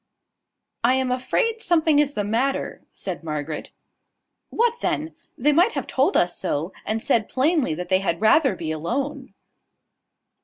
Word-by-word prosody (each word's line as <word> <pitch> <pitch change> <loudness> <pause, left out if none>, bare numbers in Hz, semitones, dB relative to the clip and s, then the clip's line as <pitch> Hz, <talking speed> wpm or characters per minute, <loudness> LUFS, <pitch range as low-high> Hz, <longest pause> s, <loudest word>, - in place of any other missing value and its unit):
"I 250 +2 +4
am 260 -1 0
afraid 445 - 0
something 320 -5 +3
is 290 -1 +1
the 205 - 0
matter," 235 +7 -1
said 185 -3 -5
Margaret. 150 -1 -4 0.8
"What 475 0 +1
then? 315 +2 -1 0.2
they 295 +4 +3
might 355 +10 +4
have - - -3
told 265 +2 +1
us 175 0 +2
so, 160 +6 -2
and 220 +1 -1
said 220 -3 +1
plainly 270 - +1
that 180 +2 -6
they 185 0 +4
had 170 -3 -1
rather 230 +3 +4
be 160 -3 -4
alone." 260 - -3
255 Hz, 150 wpm, -23 LUFS, 180-295 Hz, 0.8 s, I